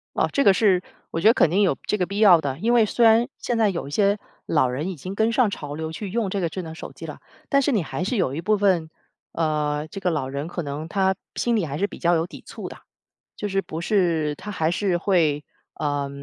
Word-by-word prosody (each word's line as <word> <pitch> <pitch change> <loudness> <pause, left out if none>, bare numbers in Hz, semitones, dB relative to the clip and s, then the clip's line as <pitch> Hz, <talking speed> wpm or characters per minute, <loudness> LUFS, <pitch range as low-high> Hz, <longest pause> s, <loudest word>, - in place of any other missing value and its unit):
啊， - - +2
这 280 - +2
个 200 - +7
是 190 -2 +3 0.3
我 165 - -2
觉 210 - +5
得 230 - +6
肯 170 - +4
定 195 +5 +3
有 180 -9 +2
这 - - +1
个 180 - +1
必 200 +2 -5
要 190 -6 +7
的。 140 -3 -3
因 230 +7 +1
为 235 -2 +5
虽 235 +3 +2
然 225 +2 +5
现 240 - -2
在 220 -2 +4
有 170 -6 -4
一 - - -9
些 200 +6 +2 0.3
老 150 -5 +2
人 135 +8 -3
已 190 - -5
经 185 +7 -7
跟 220 +2 +1
上 235 -3 +3
潮 145 -6 -6
流 160 +1 -4
去 200 +3 -6
用 220 -1 -1
这 200 - -1
个 170 - 0
智 185 +3 -5
能 160 -2 -8
手 - - -9
机 - - -9
了， - - -9 0.3
但 275 - +4
是 280 - +1
你 210 -6 +2
还 160 - -4
是 225 +6 -1
有 135 -10 0
一 155 - -3
部 215 +4 +2
分， 185 -6 +1 0.4
呃， 150 -2 -1
这 195 - -7
个 185 - +1
老 150 -5 -2
人 140 +3 -4
可 175 - -4
能 145 +2 -5
他 190 +2 +1 0.2
心 240 - 0
里 205 - +1
还 145 0 -4
是 200 - +1
比 - - -11
较 175 0 +2
有 165 0 +1
抵 - - -12
触 - - -7
的， - - -11 0.6
就 210 - -4
是 195 -1 0
不 160 -3 -6
是 170 -6 +1
他 210 - -8
还 160 -5 0
是 180 0 0
会， 165 -6 +1 0.3
呃， 145 -2 -2
180 Hz, 285 characters per minute, -23 LUFS, 155-205 Hz, 0.6 s, 个